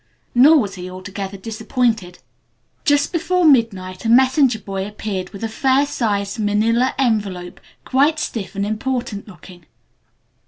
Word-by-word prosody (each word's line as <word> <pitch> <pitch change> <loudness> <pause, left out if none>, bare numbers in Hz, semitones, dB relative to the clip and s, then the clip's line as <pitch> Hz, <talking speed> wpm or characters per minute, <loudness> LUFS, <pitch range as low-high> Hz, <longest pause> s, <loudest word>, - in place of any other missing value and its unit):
Nor 285 +6 +7
was 205 -8 -1
he 180 -1 -7
altogether 190 +1 -7
disappointed. 220 -2 -2 0.7
Just 290 0 +2
before 360 +1 +1
midnight 200 -10 +2
a 225 - -1
messenger 260 0 +4
boy 195 -2 -5
appeared 205 -3 -5
with 200 +1 -10
a - - 0
fair 265 +5 +2
sized 205 -7 -2
manilla 225 +4 +1
envelope, 200 -8 -1 0.3
quite 290 +4 +2
stiff 200 - -4
and 200 +1 -1
important 220 -1 -3
looking. 175 -3 -14
215 Hz, 130 wpm, -20 LUFS, 195-260 Hz, 0.7 s, Nor